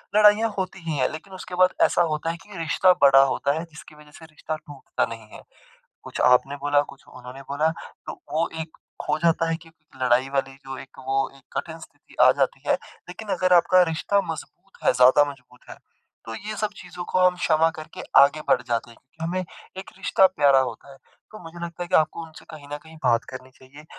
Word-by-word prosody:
लड़ाइयाँ 215 +1 +6
होती 190 0 -3
ही 155 - -1
हैं। 130 - +2
लेकिन 160 +5 -10
उसके 185 -1 -8
बाद 185 0 +4
ऐसा - - +2
होता 155 +2 -2
है 170 - -7
कि 205 -2 -12
रिश्ता 170 +3 +3
बड़ा 135 -1 +8
होता 140 +1 0
है - - -4
जिसकी 150 0 -13
वज़ह 150 0 -17
से 165 - -12
रिश्ता 155 0 -6
टूटता 145 -3 -4
नहीं 115 -1 -9
है। - - -11 0.6
कुछ - - -7
आपने 125 +3 +4
बोला, 145 0 +2
कुछ 140 -1 -11
उन्होंने 125 +2 -11
बोला, 150 +3 +1 0.4
तो - - -4 0.2
वो 165 +2 +1
एक 160 0 -10 0.2
खो - - -1
जाता 165 0 +2
है 165 - 0
कि - - -15 0.3
लड़ाई 125 +1 +2
वाली 135 -1 -2
जो 135 0 -6
एक 130 - -12
वो 135 0 +1
एक 135 - -22
कठिन 165 0 -5
स्थिति 160 - -17
आ - - +8
जाती - - 0
है। - - +4 0.4
लेकिन 210 +4 -9
अगर 185 0 +2
आपका 180 +1 +5
रिश्ता 200 +5 +1
मज़बूत 195 +4 -11
है, - - +5
ज़्यादा 130 +4 +5
मज़बूत 125 -2 -19
है - - -9 0.5
तो 115 - -6
ये 215 - -6
सब 215 0 -1
चीज़ों 180 -1 -8
को 185 - +2
हम 180 0 +4
क्षमा 165 -2 +2
करके 155 -1 -9 0.2
आगे 145 +2 +6
बढ़ 125 - +3
जाते 120 -1 -2
हैं - - -16 0.3
हमें 170 +3 -2 0.4
एक 190 - -7
रिश्ता 190 0 +3
प्यारा 145 -7 +4
होता 140 - -10
है। 135 - -14 0.3
तो 215 - -10
मुझे 165 +1 -10
लगता 170 0 -5
है 175 - -8
कि 185 - +1
आपको 155 +1 +1
उनसे 160 0 -15
कहीं 150 -3 -11
न - - -3
कहीं 160 0 -14
बात 120 -3 +3
करनी 130 0 -9
चाहिए। 140 +3 -16
155 Hz, 215 wpm, -24 LUFS, 135-180 Hz, 0.6 s, बड़ा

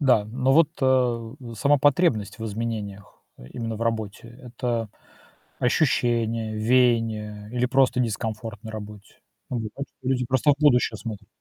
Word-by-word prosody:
Да, 125 -7 +4
но 130 +4 +1
вот, 160 +1 +6
э, 125 -3 +2 0.2
сама 140 +7 +3
потребность 135 - +2
в 110 - -5
изменениях 105 -2 -5 0.2
именно 115 - -6
в 115 - -4
работе- 110 -1 -3
это 120 -2 -3 0.7
ощущение, 115 -5 +1
веяние 110 -3 +1
или 125 0 0
просто 130 -1 +3
дискомфорт 110 -1 -3
на 110 - -7
работе? 105 -1 -10 0.3
Или 115 -4 -3
так, 140 0 -5
что 130 - -8
люди 125 -2 +1
просто 130 +3 +3
в - - -3
будущее 125 -6 +3
смотрят. 110 -3 -7
115 Hz, 140 wpm, -25 LUFS, 110-125 Hz, 0.7 s, вот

